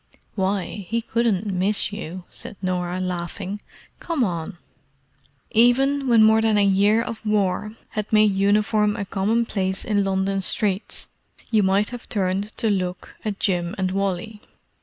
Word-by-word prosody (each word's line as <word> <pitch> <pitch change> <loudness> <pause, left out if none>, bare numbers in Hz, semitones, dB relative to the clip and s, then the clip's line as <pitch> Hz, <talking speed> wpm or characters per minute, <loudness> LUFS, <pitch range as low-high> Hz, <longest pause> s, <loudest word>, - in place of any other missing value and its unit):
"Why, 195 +1 -2
he 230 +1 +1
couldn't 220 -4 0
miss 200 +3 +2
you!" 185 -3 -6
said - - -8
Norah, 180 -1 -2
laughing. 185 +2 -4 0.4
"Come 325 -7 -1
on." 175 -2 -3 0.9
Even 270 +4 +3
when 230 -3 +6
more 220 0 +5
than 220 -1 +3
a 205 - +4
year 200 +3 +3
of 230 - -6
War 210 0 0 0.2
had 215 -1 -4
made 215 -2 +5
uniform 210 +1 +2
a 205 -3 -3
commonplace 195 -1 -1
in 205 -2 +1
London 195 0 0
streets, 195 +1 -1 0.4
you 220 -2 +4
might 195 +2 +2
have 245 -1 -9
turned 200 0 -1
to 225 - +1
look 180 -2 -3
at 210 -2 -3
Jim 175 -1 0
and 185 -1 0
Wally. 195 +2 -2
205 Hz, 145 wpm, -23 LUFS, 190-220 Hz, 0.9 s, when